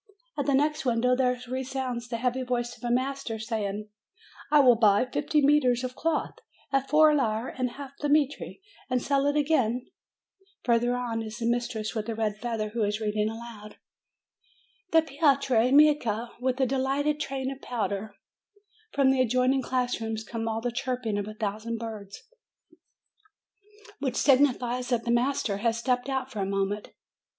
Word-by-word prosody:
At 285 -1 -2
the 280 - +3
next 300 +3 +1
window 250 0 +2
there 250 -1 +1
resounds 255 -1 -3
the 235 -1 -3
heavy 250 +2 -1
voice 240 -1 -2
of - - -20
a 240 - -1
master, 255 -1 -1
saying: 215 -2 -3 0.6
"I 300 - +6
will 255 -4 +7
buy 215 0 +4
fifty 295 +3 0
metres 260 -4 +3
of 255 0 -4
cloth 330 +9 -2 0.3
at 275 -1 0
four 305 +1 +6
lire 230 -4 0
and 255 -1 -2
a - - -13
half 280 -1 -8
the 295 - -1
metre 295 -1 +1 0.4
and 250 -1 +1
sell 280 +2 +1
it 290 - +1
again 260 -5 +1 0.7
Further 240 0 +2
on 240 -2 -2
there 225 - -4
is 215 +1 -7
the 235 - -3
mistress 235 -2 -1
with 220 -1 -3
the 225 - -3
red 215 -2 -1
feather, 225 -3 -2
who 225 +1 -1
is 205 +1 -1
reading 210 0 0
aloud: 225 -2 -9 1.1
"Then 325 -2 +4
Pietro 275 -5 +2
Micca, 260 -6 +3
with 255 0 0
the 265 - +2
lighted 285 +3 0
train 270 -2 -3
of 270 - -9
pow 240 -3 -2
der" 200 +1 -5 0.8
From 275 -2 +4
the 265 -1 +2
adjoining 255 +2 +2
class 250 -2 -1
room 225 0 -2
comes 225 -1 -3
the 245 - -1
chirping 245 -4 -2
of 205 - -4
a 215 - -7
thousand 220 +2 -3
birds, 215 -3 -8 1.8
which 265 -3 -2
signifies 255 -3 +2
that 240 -2 +1
the 235 - -1
master 240 -4 +1
has 230 +2 0
stepped 250 +2 0
out 265 -1 -2
for 215 - -6
a 195 - 0
moment. 195 +1 -2
245 Hz, 175 wpm, -27 LUFS, 225-270 Hz, 1.8 s, will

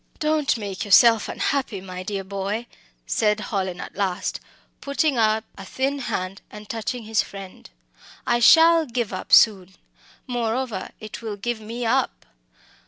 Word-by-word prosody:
"Don't 305 -3 +1
make 200 -3 -5
yourself 220 +2 +5
unhappy, 265 -8 -1
my 185 -1 -8
dear 195 0 -4
boy," 200 +4 -3 0.4
said 210 -1 +1
Hallin 190 -4 -3
at - - -8
last, 195 -2 -2 0.4
putting 280 +1 0
up 220 0 +2 0.2
a - - -7
thin 270 +8 -2
hand 195 -6 -4
and 210 0 -11
touching 230 +2 -4
his 220 0 +1
friend 195 -2 -10 0.6
"I 240 - +2
shall 325 +5 +6
give 235 -4 -2
up 185 - -6
soon. 190 -4 +5 0.5
Moreover, 240 -4 -2
it 215 +1 -8
will 215 -3 -5
give 240 +3 -3
me 230 +3 -5
up. - - 0
215 Hz, 145 wpm, -23 LUFS, 195-245 Hz, 0.6 s, shall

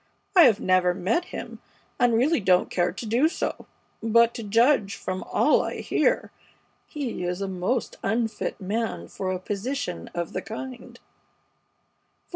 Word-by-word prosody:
I 350 -4 +9
have 220 -6 +4
never 185 -1 +2
met 205 - 0
him, - - -8 0.4
and 240 -2 +4
really 270 +8 +3
don't 185 -3 +3
care 175 -1 +1
to - - -7
do 240 +8 +3
so; 330 - -4 0.3
but 230 +1 +4
to - - -6
judge 225 -1 +3
from 185 -2 -4
all - - +4
I - - -4
hear, - - +1 0.6
he 270 - -4
is 180 +1 -2
a 195 - -2
most 190 +6 -2
unfit 220 0 -1
man 200 - -3
for 185 - -4
a 185 - -1
position 200 - -4
of 170 -1 -3
the - - -2
kind. 250 +3 -8
215 Hz, 150 wpm, -25 LUFS, 185-240 Hz, 0.6 s, I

